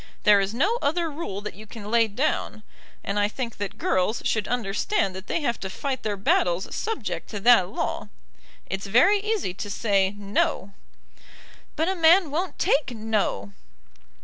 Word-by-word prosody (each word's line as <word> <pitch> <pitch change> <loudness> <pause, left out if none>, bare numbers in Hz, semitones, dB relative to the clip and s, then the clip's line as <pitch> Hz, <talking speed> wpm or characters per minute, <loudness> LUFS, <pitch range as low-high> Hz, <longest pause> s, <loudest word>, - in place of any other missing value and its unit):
There 210 -1 +6
is 195 0 0
no 395 - +1
other 325 +2 0
rule 285 - -5
that 210 - -6
you 215 +2 -12
can 210 -1 -9
lay 230 -1 +4
down, 220 -1 -2 0.4
and 200 +1 -1
I 205 - +3
think 235 +1 -5
that 205 -1 -5
girls 185 +5 0
should 215 -2 0
understand 215 - -1
that 190 +1 -8
they 335 - -1
have 235 -5 -1
to 190 - -5
fight 265 +5 -3
their 210 -2 -2
battles 185 -2 +1
subject 450 - -3
to 210 - -5
that 230 -5 +6
law. - - -3 0.6
It's 195 +2 -4
very 355 - +5
easy 420 - -1
to 205 +2 -6
say, 200 -2 +1
'No.'" 200 -1 -1 1.0
"But 320 +2 0
a 380 - +1
man 340 -1 +5
won't 350 +5 -2
take 285 -1 +2
'No.'" 215 - -1
220 Hz, 170 wpm, -25 LUFS, 200-295 Hz, 1.0 s, There